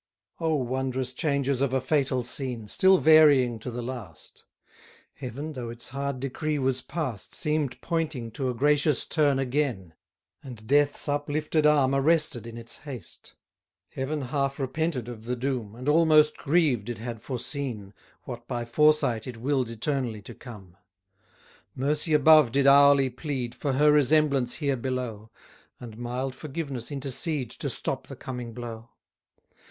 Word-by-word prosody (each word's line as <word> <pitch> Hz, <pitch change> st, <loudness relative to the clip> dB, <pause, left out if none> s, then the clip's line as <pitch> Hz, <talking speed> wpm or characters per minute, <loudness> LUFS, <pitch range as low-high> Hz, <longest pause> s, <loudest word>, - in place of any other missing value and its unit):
O 160 Hz, -1 st, +1 dB
wondrous 130 Hz, -1 st, -2 dB
changes 140 Hz, -2 st, 0 dB
of 140 Hz, -2 st, +1 dB
a -, -, +3 dB
fatal 130 Hz, -2 st, 0 dB
scene, 125 Hz, -3 st, -5 dB
Still 190 Hz, -, +4 dB
varying 145 Hz, -8 st, +5 dB
to 120 Hz, -, -6 dB
the 120 Hz, 0 st, -5 dB
last! 115 Hz, -11 st, -9 dB, 0.7 s
Heaven, 140 Hz, +4 st, -6 dB
though 125 Hz, -4 st, -5 dB
its 120 Hz, +1 st, -8 dB
hard 140 Hz, 0 st, -3 dB
decree 150 Hz, +3 st, -2 dB
was 130 Hz, -1 st, 0 dB
past, 130 Hz, -, -4 dB
Seem'd 150 Hz, -5 st, -1 dB
pointing 155 Hz, -9 st, -2 dB
to 130 Hz, +3 st, -2 dB
a 125 Hz, -, -3 dB
gracious 145 Hz, +2 st, +2 dB
turn 145 Hz, -4 st, +2 dB
again: 125 Hz, -, -1 dB, 0.5 s
And 120 Hz, -5 st, -10 dB
death's 145 Hz, +5 st, +2 dB
uplifted 150 Hz, +2 st, 0 dB
arm 140 Hz, -3 st, +4 dB
arrested 140 Hz, -4 st, +2 dB
in 115 Hz, 0 st, -8 dB
its 115 Hz, 0 st, -8 dB
haste. 130 Hz, -, -10 dB, 0.5 s
Heaven 140 Hz, +2 st, -3 dB
half 140 Hz, +1 st, -1 dB
repented 135 Hz, -1 st, -2 dB
of 115 Hz, -2 st, -8 dB
the 125 Hz, +1 st, -1 dB
doom, 120 Hz, -4 st, -3 dB
And 125 Hz, +3 st, -8 dB
almost 155 Hz, -1 st, +5 dB
grieved 140 Hz, -, +1 dB
it 120 Hz, -, -4 dB
had 115 Hz, 0 st, -6 dB
foreseen, 125 Hz, -6 st, -5 dB, 0.3 s
What 120 Hz, -1 st, -8 dB
by 120 Hz, -2 st, -3 dB
foresight 140 Hz, -3 st, +2 dB
it 125 Hz, -2 st, -7 dB
will'd 130 Hz, 0 st, 0 dB
eternally 115 Hz, -2 st, -3 dB
to -, -, -10 dB
come. 100 Hz, -8 st, -12 dB, 1.0 s
Mercy 150 Hz, +4 st, +1 dB
above 150 Hz, -3 st, +6 dB
did 140 Hz, +2 st, +2 dB
hourly 140 Hz, -1 st, +6 dB
plead 130 Hz, -3 st, -4 dB
For 140 Hz, -3 st, -2 dB
her 150 Hz, +3 st, +5 dB
resemblance 145 Hz, -3 st, +3 dB
here 140 Hz, -3 st, -1 dB
below; 120 Hz, -4 st, -4 dB, 0.5 s
And 115 Hz, -3 st, -9 dB
mild 125 Hz, +3 st, -3 dB
forgiveness 140 Hz, -3 st, -5 dB
intercede 135 Hz, 0 st, -1 dB
To -, -, -4 dB
stop -, -, -3 dB
the -, -, -8 dB
coming 125 Hz, -3 st, -7 dB
blow. 115 Hz, -1 st, -7 dB
135 Hz, 145 wpm, -27 LUFS, 120-150 Hz, 1.0 s, above